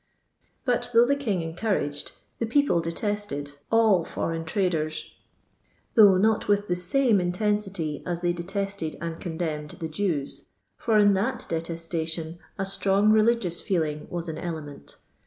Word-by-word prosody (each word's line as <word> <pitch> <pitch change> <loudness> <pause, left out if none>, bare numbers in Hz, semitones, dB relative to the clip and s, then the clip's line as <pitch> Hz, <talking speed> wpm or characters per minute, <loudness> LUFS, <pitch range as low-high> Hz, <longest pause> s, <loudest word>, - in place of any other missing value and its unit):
*" - - -43
But 245 -2 +1
though 235 +1 +8
the 280 +3 +2
King 215 -11 -1
encouraged, 165 -4 -2 0.3
the 230 - -1
people 280 -7 +3
detested, 165 -5 -3
ail 220 -6 +5
foreign 165 0 -3
traden, 160 -3 0 0.9
though 205 -4 +7
not 215 +3 +2
with 205 0 +2
the 180 - +1
same 210 +4 +3
intensity 190 -4 -1
as 175 -1 -3
they 175 -1 +1
detested 195 -1 -3
and 165 0 -5
contemned 160 -4 -4
the 165 - -3
Jews, 160 -4 -2 0.3
for 225 -3 +1
in 205 -1 +6
thai 205 +7 +1
detes 165 -2 -4
tation 165 0 -3 0.2
a 195 - -1
strong 195 +2 +2
religious 215 -5 +2
feeling 155 -5 -1
was 175 -1 -4
an 160 - -4
cle 165 -3 -4
ment. 145 -1 -11
180 Hz, 150 wpm, -26 LUFS, 165-210 Hz, 0.9 s, though